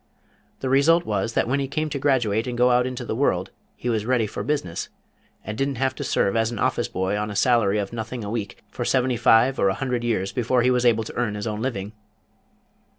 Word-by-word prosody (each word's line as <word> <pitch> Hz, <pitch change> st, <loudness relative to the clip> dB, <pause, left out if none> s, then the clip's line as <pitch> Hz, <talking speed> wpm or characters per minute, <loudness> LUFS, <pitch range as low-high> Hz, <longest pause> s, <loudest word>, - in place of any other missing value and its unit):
The 130 Hz, -, -2 dB
result 160 Hz, +6 st, +4 dB
was 105 Hz, +2 st, -1 dB
that -, -, +1 dB
when 135 Hz, +3 st, +1 dB
he 135 Hz, -, -1 dB
came 155 Hz, +3 st, -2 dB
to 140 Hz, -, -2 dB
graduate 120 Hz, -5 st, +1 dB
and 120 Hz, -1 st, -3 dB
go 125 Hz, +1 st, +4 dB
out 125 Hz, +1 st, +3 dB
into 125 Hz, -1 st, -5 dB
the -, -, -3 dB
world 95 Hz, -8 st, 0 dB, 0.2 s
he -, -, -6 dB
was 110 Hz, -3 st, 0 dB
ready 120 Hz, -1 st, +1 dB
for 105 Hz, -, -5 dB
business, 140 Hz, -, -2 dB, 0.5 s
and 105 Hz, -, -5 dB
didn't 135 Hz, +3 st, -1 dB
have 130 Hz, +2 st, 0 dB
to -, -, -6 dB
serve 100 Hz, -, +1 dB
as 115 Hz, 0 st, +2 dB
an 120 Hz, -, -5 dB
Office -, -, 0 dB
Boy 95 Hz, +2 st, -2 dB
on 105 Hz, +1 st, -2 dB
a 100 Hz, -, -6 dB
salary 110 Hz, -4 st, +3 dB
of 100 Hz, +1 st, -3 dB
nothing 115 Hz, +1 st, -5 dB
a 100 Hz, -, -5 dB
week 105 Hz, -4 st, -5 dB
for 120 Hz, -, -4 dB
seventy 130 Hz, 0 st, +1 dB
five 120 Hz, +3 st, +4 dB
or 100 Hz, -, +3 dB
a 95 Hz, -, -1 dB
hundred 125 Hz, -3 st, -2 dB
years 105 Hz, -5 st, -1 dB
before 125 Hz, 0 st, +1 dB
he 125 Hz, -, +3 dB
was 125 Hz, -1 st, +2 dB
able 115 Hz, -1 st, +3 dB
to -, -, -9 dB
earn 115 Hz, -4 st, -1 dB
his 105 Hz, -, -4 dB
own 105 Hz, -1 st, -3 dB
living." 105 Hz, -6 st, -3 dB
120 Hz, 240 wpm, -24 LUFS, 105-130 Hz, 0.5 s, result